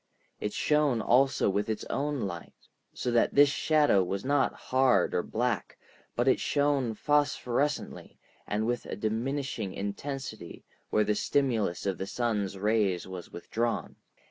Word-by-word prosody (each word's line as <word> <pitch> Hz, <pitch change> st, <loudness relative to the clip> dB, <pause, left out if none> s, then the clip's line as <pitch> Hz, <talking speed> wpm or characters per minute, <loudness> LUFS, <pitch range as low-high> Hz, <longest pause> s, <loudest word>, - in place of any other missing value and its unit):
It 105 Hz, -, -2 dB
shone 150 Hz, -3 st, +2 dB
also 130 Hz, +5 st, +3 dB
with 100 Hz, +2 st, 0 dB
its 110 Hz, -, -3 dB
own 145 Hz, -1 st, -2 dB
light, 85 Hz, -4 st, -5 dB, 0.4 s
so 125 Hz, -, -3 dB
that 120 Hz, -1 st, +2 dB
this 145 Hz, 0 st, +7 dB
shadow 145 Hz, -7 st, +3 dB
was 95 Hz, +4 st, -3 dB
not 140 Hz, -1 st, +2 dB
hard 130 Hz, -8 st, +2 dB
or -, -, +2 dB
black, 120 Hz, +4 st, -2 dB, 0.4 s
but -, -, 0 dB
it -, -, +4 dB
shone 140 Hz, -5 st, +1 dB
phosphorescently 145 Hz, 0 st, 0 dB, 0.3 s
and 105 Hz, +1 st, -1 dB
with 120 Hz, +1 st, -2 dB
a -, -, -4 dB
diminishing 115 Hz, +1 st, -2 dB
intensity 110 Hz, -1 st, -5 dB, 0.3 s
where 105 Hz, -, +3 dB
the 105 Hz, 0 st, +1 dB
stimulus 115 Hz, -7 st, 0 dB
of 95 Hz, -2 st, -1 dB
the 95 Hz, -, -3 dB
sun's 105 Hz, -5 st, -1 dB
rays 100 Hz, -3 st, +1 dB
was 95 Hz, -2 st, -8 dB
withdrawn. 115 Hz, +6 st, -3 dB
115 Hz, 145 wpm, -29 LUFS, 100-135 Hz, 0.4 s, this